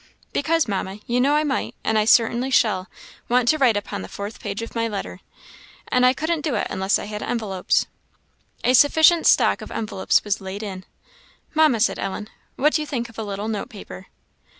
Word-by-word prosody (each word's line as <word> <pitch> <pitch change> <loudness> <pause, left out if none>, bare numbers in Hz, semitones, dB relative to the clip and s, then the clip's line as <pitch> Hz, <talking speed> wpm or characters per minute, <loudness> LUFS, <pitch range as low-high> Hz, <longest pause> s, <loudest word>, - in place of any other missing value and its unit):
"Because, 320 0 +1
Mamma, 195 0 -3
you 245 +1 +1
know 280 +3 +3
I 300 - +2
might, 280 -3 -2
and 220 - 0
I 215 -1 +3
certainly 235 +3 +3
shall, 205 -7 +2 0.4
want 245 0 +2
to 310 - +3
write 245 -6 +4
upon 200 -1 -5
the - - -7
fourth 200 +2 -7
page 205 +1 -4
of 230 - -8
my 230 -1 0
letter, 205 -3 -5 0.7
and 250 0 +4
I - - +6
couldn't 315 +4 -2
do 295 -5 -1
it 210 - 0
unless 190 +1 +1
I - - -6
had 210 0 -6
envelopes." 205 -6 0 0.8
A 250 - +3
sufficient 315 +5 +5
stock - - +4
of - - -8
envelopes 210 -3 0
was 205 -1 -2
laid 195 +2 -6
in. 190 -3 -7 0.7
"Mamma," 310 -7 +4
said 220 - +1
Ellen, 210 +2 -4 0.3
"what 300 +3 +2
do 310 - +1
you 300 - -5
think 240 -4 -3
of 230 - -11
a - - -2
little 205 0 -4
note 215 -2 -3
paper?" 195 -2 -11
225 Hz, 200 wpm, -22 LUFS, 205-270 Hz, 0.8 s, I